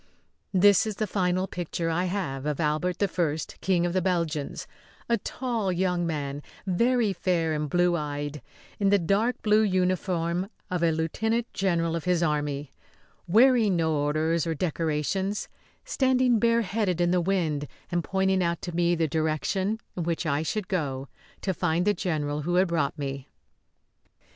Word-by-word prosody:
That 200 +2 +5
is 215 - -3
the 215 - -1
final 185 -2 0
picture 170 -2 -3
I 175 +3 0
have 150 -8 -3
of 150 -2 -2
Albert 165 +5 0
I, 175 -6 0 0.2
King 180 -3 +2
of 175 - -1
the 185 - +2
Belgians 170 -5 -1 0.4
a 235 -2 +2
tall 230 -4 -2
young 180 -1 0
man, 145 -3 -3 0.2
very 230 +3 +2
fair 170 -3 0
and 150 -1 -2
blue 175 +2 +3
eyed, 145 -2 -4 0.4
in 200 -1 +3
the 205 - +5
dark 200 +7 +1
blue 215 0 +4
uniform 185 -2 0 0.2
of 180 -2 -1
a 170 - +4
lieutenant 220 +9 -1
general 170 -4 0
of 165 - -4
his 180 -1 +2
army, 145 -2 -1 0.5
wearing 225 0 +5
no 160 -2 +1
orders 155 +3 +1
or 165 - -1
decorations, 170 +5 -1 0.4
standing 255 -3 +2
bareheaded 220 -5 +1
in 175 0 +2
the 180 -1 +3
wind 165 -6 0 0.2
and 175 -1 0
pointing 190 0 +1
out 170 -1 0
to 175 - -5
me 175 0 +2
the 165 -1 +1
direction 160 +7 -1 0.2
in 180 - -3
which 170 +1 -1
I 145 -1 +1
should 205 +5 -2
go 140 -7 -2 0.3
to 190 - -1
find 175 +1 0
the 205 - +4
general 150 -6 -2
who 175 +4 -1
had 185 0 +3
brought 155 -5 0
me. 135 -2 -4
175 Hz, 160 wpm, -27 LUFS, 155-195 Hz, 0.5 s, That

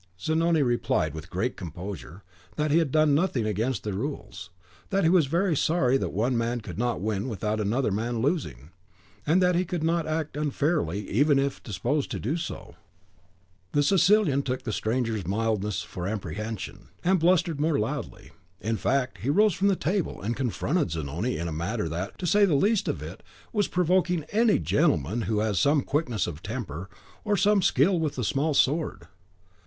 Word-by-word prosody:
Zanoni 160 - +2
replied, 120 - 0
with 80 +2 -8
great 110 +8 -2
composure, 90 - -8 0.3
that 150 0 0
he 160 - +5
had 160 -5 0
done 155 -1 +4
nothing 145 - +1
against 110 +1 -1
the 105 - -3
rules, 110 - -5 0.4
that 195 0 +1
he 165 - +4
was 175 -6 +4
very 170 +3 +1
sorry 135 -4 +2
that 135 - 0
one 120 +6 0
man 120 +1 0
could 90 -2 -8
not 120 -2 0
win 105 +2 -2
without 105 0 -2
another 110 +3 0
man 115 +4 -1
losing; 85 - -2 0.6
and 175 +5 +4
that 180 0 +4
he 175 +1 +2
could 175 -2 -3
not 165 0 +1
act 155 -1 -2
unfairly, 145 - -1
even 145 +6 +3
if 135 0 -1
disposed 120 +8 -2
to - - -4
do 135 +9 -1
so. 170 -1 -6 1.0
The 145 - +3
Sicilian 185 -3 +4
took 130 -2 -3
the 110 - -3
stranger's 110 -4 -1
mildness 105 -1 -1
for 90 -3 -6
apprehension, 105 +1 -5 0.2
and 185 +1 +3
blustered 165 -3 +2
more 155 -1 +2
loudly. 105 - -4 0.3
In 110 +1 -1
fact, 135 +1 0
he 125 - -2
rose 210 +6 +4
from 195 +5 +1
the 195 - +3
table, 180 +2 -1
and 115 +4 -2
confronted 135 - 0
Zanoni 80 - -2
in 85 +2 -3
a - - -3
manner 85 +5 -2
that, 85 +5 -4
to 185 - -5
say 205 +4 +4
the 170 -7 +2
least 205 +8 +2
of - - -2
it, - - -8 0.3
was 205 -3 +1
provoking 180 -1 +1
to 155 - -12
any 225 -1 +4
gentleman 115 - +1
who 105 -1 +1
has 105 -4 0
some 145 +5 +3
quickness 130 - -1
of 80 -2 -6
temper, 95 - -5 0.3
or 210 -2 +1
some 205 +1 +4
skill 185 0 +3
with 155 -2 -1
the 125 - -2
small 145 +6 0
sword." 150 +4 +1
130 Hz, 185 wpm, -26 LUFS, 105-165 Hz, 1.0 s, he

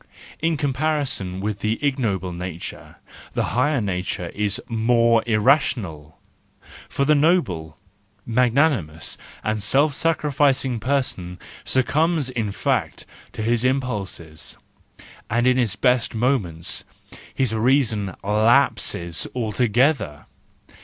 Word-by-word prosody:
In 165 -1 0
comparison 140 - -1
with 105 0 -3
the 110 +2 -1
ignoble 105 -10 -1
nature 85 -1 -7 0.4
the - - 0
higher 140 +3 +2
nature 90 -4 -3
is 105 +4 -1
more 115 0 +3
irrational: 105 - +1 0.3
— - - -20
for 140 - 0
the 150 - +4
noble, 120 - +1 0.5
magnanimous, 120 - +1 0.2
and 110 -1 -1
self 140 +8 +2
sacrificing 140 -5 +1
person 115 -10 -2 0.3
succumbs 150 +2 +1
in 115 -5 -2
fact - - -1 0.3
to 110 - -4
his 115 +1 +1
impulses, 105 - -3 0.7
and 120 +2 +1
in 125 0 +4
his 115 -5 +1
best 125 +1 +1
moments 110 - 0 0.5
his 130 -5 0
reason 110 -5 +1
lapses 105 -5 +1
altogether. 120 - +1
115 Hz, 105 wpm, -22 LUFS, 100-135 Hz, 0.7 s, the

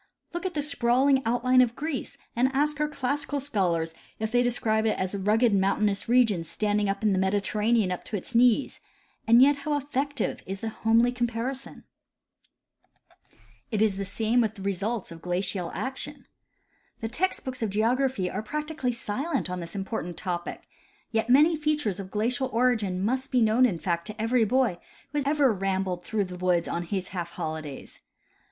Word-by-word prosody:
Look 345 +2 -2
at 360 - -7
the 295 - +1
sprawling 265 -1 +3
outline 255 +2 +4
of 240 -1 +1
Greece, 300 -3 -4 0.2
and 250 +3 +3
ask 295 +1 +1
our 300 - +2
classical 285 0 -2
scholars 175 - 0 0.2
if 220 0 -3
they 245 0 +4
describe 225 -3 +1
it 215 - +1
as 185 +1 -2
a 200 - -2
rugo 210 +5 +2
ed 225 - +3
mountainous 200 +2 +1
region 230 -8 +4
standing 205 +4 0
in 200 +1 +1
the 190 - +1
Mediterranean 205 +2 +1
up 180 - -4
to 210 - -3
its 195 - -7
knees; 245 +3 +3 0.5
and 235 +3 +8
yet 285 +1 +5
how 290 +1 -1
effective 285 0 -2
is 195 +1 -5
the 225 - -2
homely 225 +2 +3
comparison! 245 +2 -3 1.9
It 215 - -1
is 205 -3 +1
the 200 - -2
same 220 +5 +1
with 220 -2 -1
the 195 - -9
results 200 +1 -2
of 165 -1 -10
glacial 180 0 -1
action. 270 +2 -5 0.8
The 225 - -1
text 355 +12 -1
books 255 -1 -4
of 220 - 0
geography 230 0 +1
are - - -3
practically 300 +1 -3
silent 235 - -2
on 180 - -3
this 170 +2 -7
important 190 -3 -4
topic; 175 -3 -4 0.5
yet 225 +1 0
many 300 +6 +6
features 295 - -1
of 190 -1 -6
glacial 240 +6 0
origin 220 -6 +1
must 260 +4 -1
be 250 -3 +4
known 225 +4 +5
in 190 -8 -2
fact 170 +1 -2
to 215 0 -8
every 225 +1 +2
boy 240 -5 +1 0.3
who 295 0 0
has 290 +2 0
rambled 190 -7 +1
through 215 +1 -1
the 180 -1 -8
woods 180 -1 +1
on 170 0 -3
his 185 +1 -3
half 175 -3 -4
holidays. 155 -3 -6
225 Hz, 175 wpm, -27 LUFS, 195-260 Hz, 1.9 s, and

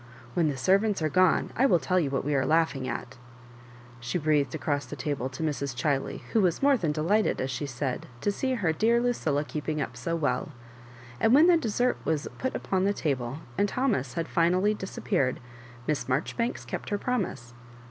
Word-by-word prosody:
"When 165 +2 +2
the 140 - -3
servants 195 +5 +2
are 155 - +2
gone 185 +3 +3
I 265 +3 +4
will 180 - +5
tell 170 +5 +1
you 150 -5 0
what 135 -1 -2
we 150 - 0
are 135 -2 +2
laughing 155 -5 +1
at," 125 0 -5 0.8
she 120 +8 -2
breathed 150 -4 +1
across 145 0 -1
the 145 - -6
table 135 -1 -2
to 130 +5 -6
Mrs. 140 -4 -2
Chiley, 135 +1 -1
who 225 - +4
was 180 +5 +1
more 280 0 +6
than 170 - 0
delighted," 170 +8 +1
as 130 +1 -2
she 135 +4 -3
said, 130 0 -3
to 205 - +1
see 260 +5 -1
her 180 -9 +1
dear 230 +7 +3
Lucilla 165 -12 0
keeping 150 0 -3
up 135 -3 -3
so 165 +7 -2
well; 145 -2 -1 0.7
and 225 - +5
when 305 +4 +7
the 355 0 +6
dessert 245 -4 +1
was 155 -2 -1
put 260 - -2
upon 190 -1 0
the 200 +1 +1
iable, 135 -3 -2 0.2
and 205 - +3
Thomas 200 - 0
had 165 -1 -2
finally 180 +5 +2
disap 190 -2 -7
peared. 135 - +1 0.5
Miss 150 -2 -1
Maijoribanks 165 - -1
kept - - -5
her 205 - 0
promise. 135 - -3
160 Hz, 200 wpm, -28 LUFS, 140-205 Hz, 0.8 s, when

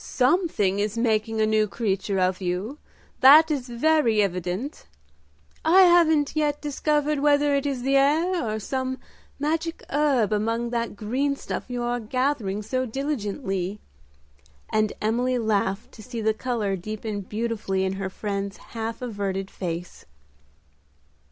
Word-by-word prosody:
"Something 255 - +1
is 210 +2 -1
making 225 -1 0
a 215 - +4
new 215 0 +2
creature 200 -2 -1
of 185 +1 +1
you, 190 +10 -3 0.4
that 310 +5 +8
is 265 -4 -2
very 240 -2 +2
evident. 185 - -4 0.8
I 355 +4 +6
haven't 320 -5 +4
yet 295 -1 +1
discovered 295 0 0
whether 290 0 +3
it 280 0 +1
is 265 -3 -3
the 275 +1 +3
air 325 +6 +2
or 215 -2 -2
some 260 +4 -3 0.4
magic 325 +3 -2
herb 275 -7 +2
among 230 +3 -1
that 235 -2 -2
green 260 +7 -1
stuff - - -5
you 245 -1 -3
are 240 0 -1
gathering 230 -4 -1
so 255 +4 -1
diligently;" 210 -7 -3 0.9
and 215 -1 +2
Emily 245 +4 +1
laughed 210 -3 -1
to - - -13
see 240 +1 -6
the 220 0 +1
color 215 -4 -2
deepen 215 +2 -5
beautifully 210 -2 -2
in 190 - -1
her 190 - -2
friend's 200 0 -4 0.2
half 225 +1 -4
averted 195 -4 -3
face. 175 -1 -6
230 Hz, 140 wpm, -25 LUFS, 205-280 Hz, 0.9 s, that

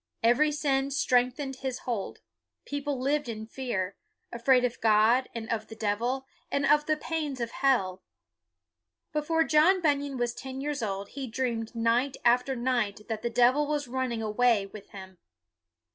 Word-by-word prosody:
Every 245 +7 +4
sin 275 -2 0
strengthened 260 0 +1
his 260 -1 -3
hold. 230 -6 -3 0.4
People 285 -1 -3
lived 280 0 0
in 220 -1 -5
fear; 220 -6 -3 0.3
afraid 250 +1 +3
of 245 0 -4
God, 225 +4 +4
and 225 -1 -5
of 220 -1 -2
the 220 - -10
devil, 230 +5 -1 0.3
and 280 0 +1
of 295 +1 +4
the 310 0 +2
pains 300 -4 -3
of 235 -1 -3
hell. 195 -10 +1 1.1
Before 325 +2 +1
John 320 +5 +4
Bunyan 285 -4 0
was 240 -1 -1
ten 260 +2 -7
years 290 -1 -3
old 200 -2 -3
he 275 -2 -6
dreamed 230 -1 -3
night 235 +4 +1
after 250 +3 +3
night 235 -5 -1
that 220 -1 -3
the 235 - -1
devil 250 +5 +3
was 295 -2 -1
running 245 -2 -2
away 220 -1 +2
with 200 +1 -12
him. 190 -2 -11
250 Hz, 160 wpm, -28 LUFS, 225-280 Hz, 1.1 s, Every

